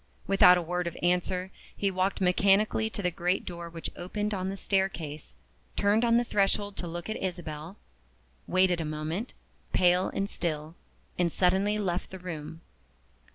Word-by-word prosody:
Without 195 Hz, -2 st, +7 dB
a 175 Hz, -, -1 dB
word 180 Hz, +1 st, -2 dB
of 170 Hz, -, -5 dB
answer, 180 Hz, +1 st, +1 dB, 0.3 s
he 200 Hz, -1 st, +1 dB
walked 190 Hz, +1 st, 0 dB
mechanically 200 Hz, +4 st, +3 dB
to 205 Hz, -, -5 dB
the 180 Hz, -, +1 dB
great 180 Hz, +3 st, 0 dB
door 170 Hz, -1 st, -6 dB
which 165 Hz, -1 st, -6 dB
opened 210 Hz, +4 st, -3 dB
on 190 Hz, -1 st, -2 dB
the 195 Hz, -, -4 dB
staircase 170 Hz, -, -2 dB, 0.4 s
turned 205 Hz, +3 st, +3 dB
on 235 Hz, 0 st, +4 dB
the 240 Hz, -, +3 dB
threshold 205 Hz, -2 st, 0 dB
to 175 Hz, -, -4 dB
look 170 Hz, +1 st, -5 dB
at 220 Hz, -, -3 dB
Isabel 170 Hz, -1 st, -5 dB, 0.7 s
waited 185 Hz, -2 st, +3 dB
a -, -, -1 dB
moment, 155 Hz, +8 st, -3 dB, 0.4 s
pale 180 Hz, +1 st, +4 dB
and 195 Hz, -, -1 dB
still 155 Hz, -4 st, -3 dB, 0.5 s
and 175 Hz, -1 st, +2 dB
suddenly 190 Hz, +4 st, +2 dB
left 185 Hz, -3 st, -2 dB
the 190 Hz, -, -8 dB
room. 165 Hz, -3 st, -7 dB
180 Hz, 160 wpm, -29 LUFS, 170-195 Hz, 0.7 s, Without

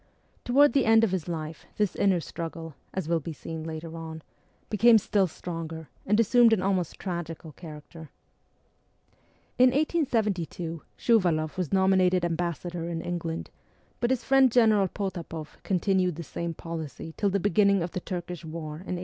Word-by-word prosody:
Towards 280 Hz, +4 st, +5 dB
the 275 Hz, -3 st, +3 dB
end 225 Hz, 0 st, +6 dB
of 220 Hz, -, +2 dB
his 185 Hz, -4 st, -2 dB
life 160 Hz, -2 st, -5 dB
this 210 Hz, -4 st, +1 dB
inner 190 Hz, -3 st, +3 dB
struggle, 165 Hz, -1 st, -6 dB, 0.2 s
as 190 Hz, -5 st, -3 dB
will 165 Hz, 0 st, +2 dB
be 160 Hz, +2 st, -6 dB
seen 160 Hz, +2 st, -7 dB
later 160 Hz, +1 st, -6 dB
on, 160 Hz, -1 st, -7 dB, 0.4 s
became 225 Hz, +2 st, +6 dB
still 200 Hz, -2 st, +2 dB
stronger, 160 Hz, -2 st, -6 dB, 0.2 s
and 210 Hz, +2 st, +3 dB
assumed 230 Hz, +1 st, +5 dB
an 210 Hz, -, +2 dB
almost 185 Hz, -4 st, 0 dB
tragical 170 Hz, -3 st, -5 dB
character. 160 Hz, 0 st, -11 dB, 1.5 s
In 255 Hz, 0 st, +8 dB
1872 215 Hz, -, -1 dB, 0.2 s
Shuvaloff 175 Hz, -9 st, +2 dB
was 180 Hz, -5 st, -3 dB
nominated 185 Hz, -2 st, +3 dB
ambassador 170 Hz, 0 st, -3 dB
in 165 Hz, -1 st, -3 dB
England, 165 Hz, -2 st, -4 dB, 0.5 s
but 240 Hz, -, +1 dB
his 260 Hz, -2 st, 0 dB
friend 270 Hz, -2 st, +5 dB
General 220 Hz, -5 st, +4 dB
Potapoff 170 Hz, -5 st, -6 dB
continued 185 Hz, -2 st, +1 dB
the 170 Hz, -, -6 dB
same 170 Hz, +2 st, -5 dB
policy 160 Hz, -1 st, -6 dB
till 205 Hz, -, +1 dB
the 200 Hz, +1 st, 0 dB
beginning 200 Hz, 0 st, +3 dB
of 170 Hz, -, -4 dB
the -, -, -3 dB
Turkish 175 Hz, -1 st, -6 dB
war 155 Hz, -1 st, -6 dB
in 180 Hz, -1 st, -4 dB
1877. -, -, -5 dB
175 Hz, 160 wpm, -27 LUFS, 165-200 Hz, 1.5 s, In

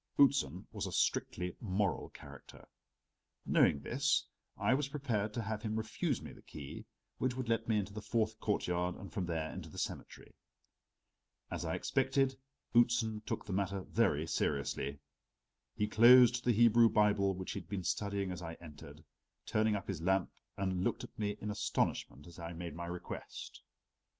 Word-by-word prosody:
Outzen 95 Hz, -, +4 dB
was -, -, -3 dB
a -, -, -5 dB
strictly 90 Hz, 0 st, 0 dB
moral 100 Hz, -2 st, -1 dB
character; -, -, -13 dB, 0.8 s
knowing 70 Hz, -, +4 dB
this, 135 Hz, -, +1 dB, 0.3 s
I -, -, +2 dB
was 140 Hz, +1 st, +1 dB
prepared 120 Hz, -8 st, -1 dB
to 115 Hz, -, -1 dB
have 110 Hz, 0 st, -3 dB
him 110 Hz, -1 st, -2 dB
refuse 110 Hz, -, -1 dB
me -, -, -8 dB
the -, -, -15 dB
key 70 Hz, -2 st, -9 dB, 0.3 s
which 130 Hz, -1 st, 0 dB
would 130 Hz, -2 st, -3 dB
let 115 Hz, 0 st, 0 dB
me 110 Hz, -2 st, +2 dB
into 100 Hz, 0 st, -2 dB
the 105 Hz, -, -5 dB
fourth 110 Hz, 0 st, 0 dB
courtyard 90 Hz, -4 st, 0 dB
and 100 Hz, -4 st, -10 dB
from 95 Hz, -3 st, -2 dB
there 80 Hz, -2 st, -2 dB
into -, -, -7 dB
the -, -, -12 dB
cemetery. -, -, -5 dB, 1.2 s
As -, -, -3 dB
I -, -, -1 dB
expected, 135 Hz, 0 st, +1 dB, 0.4 s
Outzen 120 Hz, -2 st, +3 dB
took -, -, -3 dB
the 100 Hz, -, -4 dB
matter 100 Hz, 0 st, -1 dB
very 90 Hz, -7 st, +1 dB
seriously. 70 Hz, -2 st, -1 dB, 0.8 s
He 105 Hz, -, 0 dB
closed 120 Hz, +2 st, +7 dB
the 125 Hz, -, +3 dB
Hebrew 115 Hz, 0 st, +6 dB
Bible 100 Hz, -3 st, +3 dB
which 95 Hz, 0 st, -5 dB
he -, -, -3 dB
had 85 Hz, -, -14 dB
been 95 Hz, -2 st, -3 dB
studying 100 Hz, 0 st, -1 dB
as 90 Hz, -, -5 dB
I 80 Hz, -1 st, -6 dB
entered, 75 Hz, -2 st, -12 dB, 0.4 s
turned 110 Hz, -1 st, +2 dB
up 100 Hz, -, -8 dB
his 95 Hz, -5 st, -3 dB
lamp 95 Hz, -1 st, +1 dB, 0.3 s
and 95 Hz, -2 st, -1 dB
looked -, -, -1 dB
at -, -, -11 dB
me 105 Hz, -1 st, -1 dB
in 105 Hz, -, -3 dB
astonishment 75 Hz, -7 st, -1 dB
as 85 Hz, -1 st, -12 dB
I 85 Hz, 0 st, -5 dB
made 85 Hz, -1 st, -6 dB
my 85 Hz, +2 st, -5 dB
request. 90 Hz, 0 st, -7 dB
105 Hz, 170 wpm, -34 LUFS, 90-115 Hz, 1.2 s, closed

